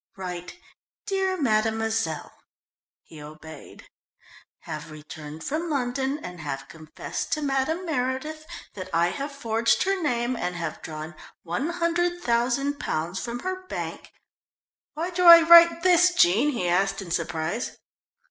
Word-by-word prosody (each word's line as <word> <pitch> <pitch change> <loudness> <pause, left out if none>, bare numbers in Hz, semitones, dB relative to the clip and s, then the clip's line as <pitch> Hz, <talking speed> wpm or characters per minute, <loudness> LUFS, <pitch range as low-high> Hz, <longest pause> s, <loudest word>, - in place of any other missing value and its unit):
"Write, 180 - -6 0.5
'Dear 385 -2 -1
Mademoiselle'." 220 - 0 0.7
He 155 -2 -13
obeyed. 155 0 -12 0.8
"'_have - - -6
returned 155 0 -10
from 330 +3 -3
London, 270 0 -1
and 180 -1 -8
have 135 -3 -5
confessed 155 0 -7
to 305 - -1
Madame 285 +6 -1
Meredith 305 +2 -3 0.3
that 185 -2 -7
I 170 +1 +3
have 280 +8 -5
forged 230 -5 +1
her 390 0 0
name 245 -4 0
and 180 -5 -3
have 165 -3 -5
drawn 155 +1 -7 0.3
£100,000 275 - -1
from 240 0 -4
her 370 0 -5
bank - - -5
_'" - - -17 0.9
"Why 335 +4 -3
do 360 0 0
I 335 0 +12
write 335 0 +8
this, 360 0 +5
Jean?" 225 - +4
he 235 -11 -2
asked 195 +3 +1
in 175 - -10
surprise. 165 +5 -2
240 Hz, 130 wpm, -25 LUFS, -, 0.9 s, I